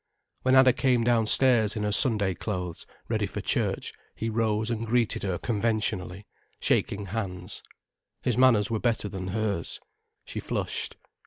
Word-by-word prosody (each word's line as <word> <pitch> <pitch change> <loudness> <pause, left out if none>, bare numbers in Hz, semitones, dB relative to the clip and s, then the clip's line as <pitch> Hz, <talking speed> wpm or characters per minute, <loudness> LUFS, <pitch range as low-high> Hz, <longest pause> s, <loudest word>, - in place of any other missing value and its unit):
When 130 +1 +3
Anna 130 -1 +7
came 125 -3 +2
downstairs 115 -1 +3
in 105 - -2
her 105 - 0
Sunday 105 -3 +3
clothes, 90 -3 -5 0.2
ready - - 0
for - - -5
church, - - -1 0.2
he 115 0 -3
rose 110 0 0
and 115 -1 -2
greeted 120 -1 +1
her 95 -3 -1
conventionally, 105 -4 -1 0.3
shaking 100 0 0
hands. 95 -2 -5 0.6
His 125 - +1
manners 120 -5 +4
were 110 - 0
better 115 -3 0
than 95 -2 -5
hers. 100 -3 -2 0.5
She - - -5
flushed. - - -3
110 Hz, 145 wpm, -27 LUFS, 100-115 Hz, 0.6 s, Anna